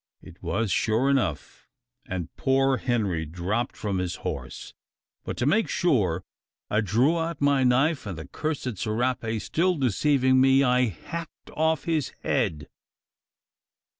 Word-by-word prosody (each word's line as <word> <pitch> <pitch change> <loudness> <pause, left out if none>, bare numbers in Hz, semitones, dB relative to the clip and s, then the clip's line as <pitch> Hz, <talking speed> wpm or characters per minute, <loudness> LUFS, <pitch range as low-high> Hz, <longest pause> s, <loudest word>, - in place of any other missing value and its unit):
It - - -14
was 110 -1 -1
sure 115 +8 +2
enough; 135 -8 -2 0.4
and 90 -3 -5
poor 135 0 +2
Henry 105 -11 0
dropped 90 +9 -3
from 100 -3 -2
his 90 -1 -2
horse. - - -5 0.5
But - - -5
to 120 - 0
make 215 +10 +3
more - - -12
sure, 100 - +1 0.5
I 105 - +3
drew 120 - +2
out 165 +1 -3
my 140 -2 +3
knife; 130 +2 +2
and 95 -5 -5
the 80 - -8
cursed 140 - -3
serape 115 0 -1
still 180 - +1
deceiving 130 - +3
me, 135 +1 +5
I 125 -1 +3
hacked 155 - -7
off 160 -2 +1
his 160 -6 -1
head." 75 -3 -1
125 Hz, 140 wpm, -26 LUFS, 105-145 Hz, 0.5 s, me